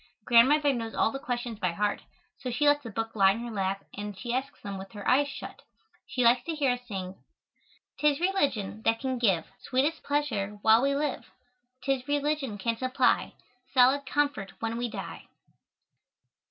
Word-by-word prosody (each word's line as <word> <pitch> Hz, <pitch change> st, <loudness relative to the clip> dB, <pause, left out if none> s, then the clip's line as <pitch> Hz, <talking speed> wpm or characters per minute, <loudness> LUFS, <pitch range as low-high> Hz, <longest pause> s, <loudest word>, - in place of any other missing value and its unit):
Grandmother 275 Hz, +5 st, +5 dB
knows 230 Hz, -2 st, -4 dB
all -, -, +2 dB
the 270 Hz, -, -5 dB
questions 240 Hz, -3 st, -4 dB
by 180 Hz, -4 st, 0 dB
heart, 205 Hz, +3 st, -1 dB, 0.4 s
so 255 Hz, -, -4 dB
she 250 Hz, +5 st, 0 dB
lets 290 Hz, 0 st, +4 dB
the 235 Hz, -, -8 dB
book 225 Hz, +1 st, -4 dB
lie 195 Hz, -2 st, +5 dB
in 225 Hz, -, -5 dB
her 240 Hz, 0 st, -5 dB
lap 195 Hz, -1 st, -2 dB
and 205 Hz, -1 st, -6 dB
she 235 Hz, +5 st, -4 dB
asks 265 Hz, +3 st, -3 dB
them 200 Hz, -1 st, -6 dB
with 195 Hz, +2 st, -9 dB
her 205 Hz, -2 st, -7 dB
eyes 280 Hz, +3 st, +4 dB
shut. 280 Hz, -, -8 dB, 0.5 s
She 250 Hz, -, -1 dB
likes 240 Hz, +1 st, +5 dB
to 330 Hz, -, -2 dB
hear 280 Hz, -4 st, +2 dB
us 245 Hz, -, -2 dB
sing: 190 Hz, -3 st, -6 dB, 0.8 s
"'Tis 300 Hz, -1 st, +3 dB
religion 280 Hz, -, 0 dB
that 225 Hz, 0 st, +2 dB
can 260 Hz, -2 st, -2 dB
give 190 Hz, -9 st, +2 dB
Sweetest 285 Hz, +5 st, 0 dB
pleasure 220 Hz, -9 st, -1 dB
while 220 Hz, +1 st, +6 dB
we 275 Hz, +1 st, +2 dB
live, 290 Hz, -1 st, -2 dB, 0.5 s
'Tis 270 Hz, -1 st, -1 dB
religion 290 Hz, -5 st, -1 dB
can 230 Hz, +2 st, -1 dB
supply 255 Hz, +2 st, +1 dB, 0.4 s
Solid 260 Hz, +2 st, +5 dB
comfort 280 Hz, -10 st, -1 dB
when 225 Hz, 0 st, -2 dB
we 240 Hz, +1 st, -2 dB
die." -, -, -7 dB
245 Hz, 180 wpm, -28 LUFS, 210-280 Hz, 0.8 s, while